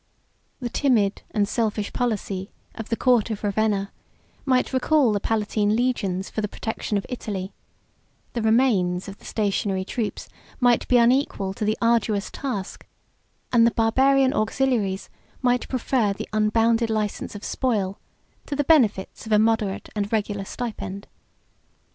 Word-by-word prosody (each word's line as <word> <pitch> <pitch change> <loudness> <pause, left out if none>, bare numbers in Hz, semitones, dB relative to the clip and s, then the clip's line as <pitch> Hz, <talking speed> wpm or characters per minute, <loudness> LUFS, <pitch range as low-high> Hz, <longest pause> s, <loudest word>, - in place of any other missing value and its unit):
The 245 -2 -3
timid 225 -9 +2
and 205 -1 +1
selfish 215 -2 -1
policy 205 -5 -2 0.2
of 225 - -7
the 230 - +1
court 240 -2 +3
of 220 -1 -4
Ravenna 205 -1 0 0.5
might 260 -1 +1
recall 260 -1 +3
the 205 - +1
Palatine 210 0 0
legions 205 -6 0
for 215 - -3
the 210 - -1
protection 220 0 -3
of 200 - -3
Italy; 200 -6 -5 0.8
the 235 - -2
remains 220 -6 +2
of 195 0 -9
the - - -17
stationary 195 -2 -1
troops 220 +1 -3 0.3
might 245 -2 +3
be 250 - +4
unequal 235 -5 +2
to 205 - -5
the 215 +1 +1
arduous 225 -3 +1
task; 210 -9 -5 0.7
and 230 -1 +6
the - - +5
Barbarian 260 +4 +3
auxiliaries 215 -3 0 0.4
might 245 0 +1
prefer 245 -4 +1
the - - -6
unbounded 225 +2 +2
license 215 -1 -2
of 205 - -8
spoil 205 -7 -1 0.5
to 285 - -3
the 290 - +1
benefits 230 -10 +2
of - - -6
a 210 - +6
moderate 215 -2 +1
and 205 -1 -2
regular 205 -2 -1
stipend. 205 -4 -5
220 Hz, 145 wpm, -24 LUFS, 200-245 Hz, 0.8 s, and